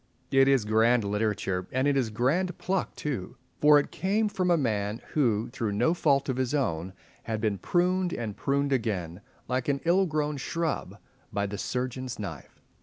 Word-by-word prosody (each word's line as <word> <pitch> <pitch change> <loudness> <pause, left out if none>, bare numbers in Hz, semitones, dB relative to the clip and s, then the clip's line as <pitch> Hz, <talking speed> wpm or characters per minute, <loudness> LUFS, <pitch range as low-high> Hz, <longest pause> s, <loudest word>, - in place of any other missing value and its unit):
It 135 0 +5
is 135 -5 +3
grand 110 +2 +3
literature, 100 -3 -1
and 130 +2 +1
it 145 - +2
is 130 -4 +1
grand 145 - 0
pluck 190 0 -2
too; 130 -12 -4 0.2
for 150 0 +7
it 145 - 0
came 210 +3 0
from 185 -3 -1
a 170 - +5
man 105 -5 -1
who, 120 -6 +1
through 115 -5 -2
no 160 +11 +2
fault 140 -5 +2
of 130 -2 -1
his 130 +2 0
own, 95 - -1 0.3
had 110 -1 -2
been 105 -3 -1
pruned, 180 - +1
and 110 -8 -4
pruned 140 +4 0
again, 100 -8 -2 0.3
like 125 0 -1
an 140 -1 +1
ill 185 +3 +4
grown 150 -2 -1
shrub, 155 - -3 0.3
by 100 0 -1
the 100 0 -5
surgeon's 130 +1 -3
knife. 90 -9 -8
130 Hz, 180 wpm, -28 LUFS, 105-150 Hz, 0.3 s, for